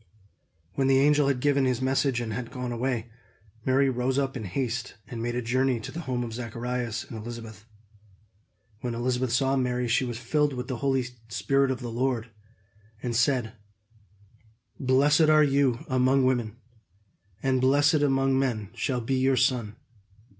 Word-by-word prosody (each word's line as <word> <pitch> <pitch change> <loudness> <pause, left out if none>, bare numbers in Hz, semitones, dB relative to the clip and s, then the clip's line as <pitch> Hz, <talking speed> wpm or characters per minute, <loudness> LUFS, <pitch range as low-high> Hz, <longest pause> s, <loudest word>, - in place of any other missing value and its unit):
When 135 +5 +1
the 135 0 +4
angel 145 +1 +4
had 135 -3 0
given 140 -1 +2
his 125 -2 +1
message 130 -1 +1
and 110 -2 -4
had 125 0 -4
gone 125 -2 -5
away, 120 -1 -2 0.5
Mary 135 +1 +3
rose 130 +1 0
up 135 -1 0
in 115 -4 -5
haste 120 +4 -3
and 120 -3 -6
made 120 +1 -2
a 125 - -2
journey 130 +1 +1
to 110 - -7
the 165 - -6
home 125 -1 -1
of 115 -2 -6
Zacharias 120 0 -3
and - - -10
Elizabeth. 110 -2 -8 1.1
When 120 0 -3
Elizabeth 125 +1 -1
saw 135 +2 +2
Mary, 125 -1 0
she 120 +3 +2
was 120 -2 -4
filled 145 +4 0
with 125 +1 -5
the 130 0 -1 0.2
Spirit 125 +6 +1
of 130 -2 -2
the 120 -1 -5
Lord, 120 -1 -1 0.7
and 120 -2 -2
said: 125 -1 +1 1.3
"Blessed 145 +4 +4
are 155 0 +6
you 135 -4 +1
among 130 +1 +3
women, 120 -4 0 0.9
and 130 -1 +2
blessed 145 +3 +4
among 135 -1 +2
men 115 -7 -1
shall 125 -2 -2
be 130 +3 -1
your 130 0 +2
son! 120 -4 +1
125 Hz, 160 wpm, -27 LUFS, 120-135 Hz, 1.3 s, are